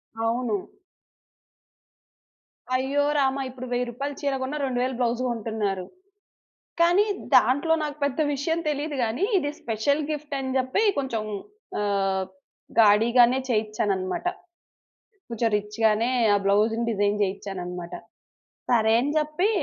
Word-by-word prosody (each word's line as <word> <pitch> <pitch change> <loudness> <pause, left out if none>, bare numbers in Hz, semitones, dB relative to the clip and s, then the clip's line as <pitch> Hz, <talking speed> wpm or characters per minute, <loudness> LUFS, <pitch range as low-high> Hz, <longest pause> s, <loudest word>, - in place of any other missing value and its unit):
అవును. 225 -2 -1 2.1
అయ్యో! 275 +3 +1
రామ! 270 -1 +2
ఇప్పుడు 255 0 -8
1000 245 0 0
రూపాయలు 280 +4 -4
చీర 280 -1 0
గొన్న, 260 +3 -3
2000 255 -1 0
బ్లౌజ్ 240 0 0
గొంటున్నారు. 215 -5 -2 1.0
కానీ 350 +4 +5 0.3
దాంట్లో 285 +6 +4
నాకు 295 -1 -3
పెద్ద 285 +2 -1
విషయం 325 +4 -1
తెలీదు 295 0 -2
గానీ, 235 - -1
ఇది 290 -3 -2
స్పెషల్ 240 +7 0
గిఫ్ట్ 300 -1 -4
అని 260 -1 -3
జెప్పి 260 +10 +1 0.2
కొంచెం 260 -6 -1 0.6
ఆహ్, 195 -2 0 0.6
గాడి 210 +1 +5
గానే 245 +2 +6
చేయిచ్చానన్నమాట. 210 - -1 1.0
కొంచెం 230 0 0
రిచ్ 210 +1 -4
గానే 220 +2 +3 0.2
ఆ - - +5
బ్లౌజ్‌ని 215 +3 +2
డిజైన్ 205 0 +1
జేయిచ్చానన్నమాట. 180 -3 -5 0.8
సరే 220 -2 +3
అని 285 +3 -1
జెప్పి 305 +6 +1
240 Hz, 115 wpm, -25 LUFS, 210-280 Hz, 2.1 s, గానే